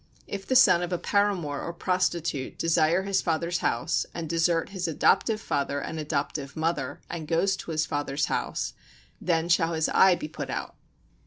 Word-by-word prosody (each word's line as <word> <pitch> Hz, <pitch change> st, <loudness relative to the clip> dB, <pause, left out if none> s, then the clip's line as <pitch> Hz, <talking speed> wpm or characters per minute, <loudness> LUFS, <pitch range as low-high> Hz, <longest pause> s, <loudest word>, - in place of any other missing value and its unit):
If 195 Hz, -1 st, -6 dB
the 260 Hz, -, +1 dB
son 175 Hz, -8 st, +7 dB
of 175 Hz, 0 st, -3 dB
a 180 Hz, -, +1 dB
paramour 180 Hz, -8 st, 0 dB
or -, -, -4 dB
a -, -, -5 dB
prostitute 170 Hz, -6 st, -1 dB
desire 165 Hz, +2 st, +2 dB
his 195 Hz, -1 st, +1 dB
father's 170 Hz, +1 st, -1 dB
house, 125 Hz, +9 st, 0 dB
and 170 Hz, -1 st, -4 dB
desert 165 Hz, +2 st, +1 dB
his 190 Hz, -3 st, -3 dB
adoptive 215 Hz, +7 st, +2 dB
father 140 Hz, -8 st, -1 dB
and 160 Hz, +2 st, -5 dB
adoptive 145 Hz, -2 st, -3 dB
mother, 150 Hz, -4 st, -2 dB
and 160 Hz, -3 st, -6 dB
goes 175 Hz, +4 st, +2 dB
to -, -, -9 dB
his 155 Hz, -1 st, 0 dB
father's 145 Hz, 0 st, -1 dB
house, -, -, -2 dB, 0.5 s
then 165 Hz, -1 st, +1 dB
shall 170 Hz, -1 st, +2 dB
his 160 Hz, -1 st, 0 dB
eye 190 Hz, -1 st, +6 dB
be 300 Hz, -, -5 dB
put -, -, -6 dB
out. -, -, -4 dB
165 Hz, 180 wpm, -27 LUFS, 155-180 Hz, 0.5 s, son